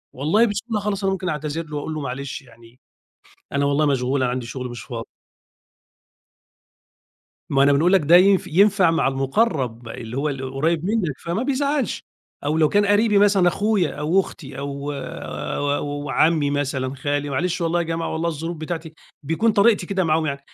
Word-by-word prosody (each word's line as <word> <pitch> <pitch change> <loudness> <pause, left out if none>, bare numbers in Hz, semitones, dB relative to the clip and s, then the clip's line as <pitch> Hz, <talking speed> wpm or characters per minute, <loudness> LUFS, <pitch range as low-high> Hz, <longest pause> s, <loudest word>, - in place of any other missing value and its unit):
والله 160 - +3
بسهولة 215 +1 -2
خالص 200 -1 -2
أنا 195 - +2
ممكن 185 -1 -3
أعتذر 155 +1 -3
له 150 -1 -8
وأقول 150 +2 -4
له: 155 - -4
"معلش 140 +2 -5
يعني 120 -2 -19 0.7
أنا 140 0 +1
والله 145 +2 +2
مشغول 135 -1 +1
أنا 125 - +1
عندي 125 -1 -4
شغل 125 +1 -5
مش 120 - -7
فاضي". 115 -4 -7 2.4
ما 135 -2 +3
أنا 140 +1 +5
بنقول 160 +6 +3
لك 195 - +6
ده 160 +3 +6
ين 195 +2 +6
ينفع 195 +1 +4
مع 165 - +2
المُقرّب 135 - -1
اللي 115 +1 -7
هو 145 +3 0
القريّب 140 +4 -1
منك 185 - -1
فما 175 +7 -3
بيزعّلش، 280 0 -1 0.4
أو 150 +2 0
لو 155 -1 +4
كان 205 +3 +2
قرِيبي 205 +1 +3
مثلًا 200 -3 +4
أخويا 200 -3 +1
أو 155 +6 +2
أختي 145 -6 -9
أو، 140 +1 -4
أو 145 - -4
عمّي 155 +2 +2
مثلًا، 135 -2 -2
خالي 145 +1 -2
"معلش 180 +6 -1
والله 170 0 +1
يا - - 0
جماعة 165 0 -3
والله 160 +1 -1
الظروف 165 +2 -4
بتاعتي" 160 0 -6 0.3
بيكون 215 +9 +2
طريقتي 205 -2 +3
كده 190 -1 0
معاهم 160 0 +1
يعني 140 -2 -3
155 Hz, 170 wpm, -22 LUFS, 140-185 Hz, 2.4 s, لك